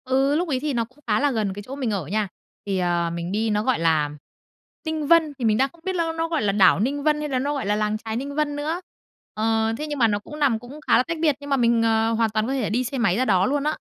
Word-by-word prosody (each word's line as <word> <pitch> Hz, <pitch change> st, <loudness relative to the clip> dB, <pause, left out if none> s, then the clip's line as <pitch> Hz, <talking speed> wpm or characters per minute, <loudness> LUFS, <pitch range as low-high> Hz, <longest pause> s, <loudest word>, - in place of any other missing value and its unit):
Ừ, 270 Hz, +2 st, +2 dB
lúc 350 Hz, +3 st, 0 dB
ấy 260 Hz, -3 st, 0 dB
thì 295 Hz, +1 st, -2 dB
nó 230 Hz, -2 st, 0 dB
cũng 255 Hz, +5 st, -26 dB
khá 210 Hz, -1 st, +2 dB
là 290 Hz, 0 st, +2 dB
gần 215 Hz, -5 st, -1 dB
cái 205 Hz, -, -7 dB
chỗ 265 Hz, -, -7 dB
mình 260 Hz, -5 st, -2 dB
ở 195 Hz, -6 st, -2 dB
nha. 210 Hz, +3 st, 0 dB, 0.4 s
Thì, 195 Hz, -2 st, -1 dB
ờ, 175 Hz, -1 st, +1 dB
mình 170 Hz, +1 st, -4 dB
đi 220 Hz, +2 st, 0 dB
nó, 210 Hz, 0 st, +1 dB
gọi 260 Hz, -4 st, +1 dB
là, 160 Hz, -3 st, +2 dB, 0.7 s
Tinh 315 Hz, -3 st, -3 dB
Vân, 325 Hz, -2 st, +4 dB
thì 240 Hz, -, -1 dB
mình 215 Hz, -1 st, +3 dB
đang 270 Hz, +3 st, +2 dB
không 335 Hz, -, -22 dB
biết 380 Hz, -1 st, -1 dB
ló 335 Hz, -2 st, 0 dB
nó 325 Hz, 0 st, -1 dB
gọi 325 Hz, -2 st, -1 dB
là 205 Hz, -, +2 dB
đảo 190 Hz, -4 st, +5 dB
Ninh 280 Hz, +6 st, -1 dB
Vân 300 Hz, 0 st, +2 dB
hay 300 Hz, 0 st, -3 dB
là 260 Hz, -2 st, 0 dB
nó 285 Hz, +3 st, -1 dB
gọi 280 Hz, -, -3 dB
là 205 Hz, +1 st, +1 dB
làng 210 Hz, 0 st, 0 dB
chài 220 Hz, 0 st, -5 dB
Ninh 280 Hz, +4 st, -4 dB
Vân 300 Hz, -1 st, 0 dB
nữa, 310 Hz, +5 st, -2 dB, 0.5 s
ờ, 225 Hz, +1 st, +1 dB
thế 300 Hz, -, -4 dB
nhưng 295 Hz, -2 st, -4 dB
mà 230 Hz, -, +5 dB
nó 205 Hz, -1 st, 0 dB
cũng 300 Hz, +8 st, -10 dB
nằm 265 Hz, -7 st, +2 dB
cũng 250 Hz, +6 st, -11 dB
khá -, -, +5 dB
là -, -, +3 dB
tách 335 Hz, +5 st, -4 dB
biệt, 305 Hz, -4 st, +3 dB
nhưng 285 Hz, 0 st, -9 dB
mà 275 Hz, -, +2 dB
mình, 235 Hz, -2 st, +3 dB
ờ, 225 Hz, 0 st, +2 dB
hoàn 225 Hz, 0 st, +2 dB
toàn 215 Hz, +1 st, -1 dB
có 265 Hz, -, -1 dB
thể 255 Hz, -6 st, -1 dB
đi 240 Hz, +4 st, 0 dB
xe 265 Hz, +2 st, -4 dB
máy 220 Hz, -6 st, +2 dB
ra 255 Hz, -, +1 dB
đó 190 Hz, -4 st, +3 dB
luôn 280 Hz, +3 st, 0 dB
á. 305 Hz, +1 st, -1 dB
245 Hz, 310 wpm, -23 LUFS, 215-290 Hz, 0.7 s, đảo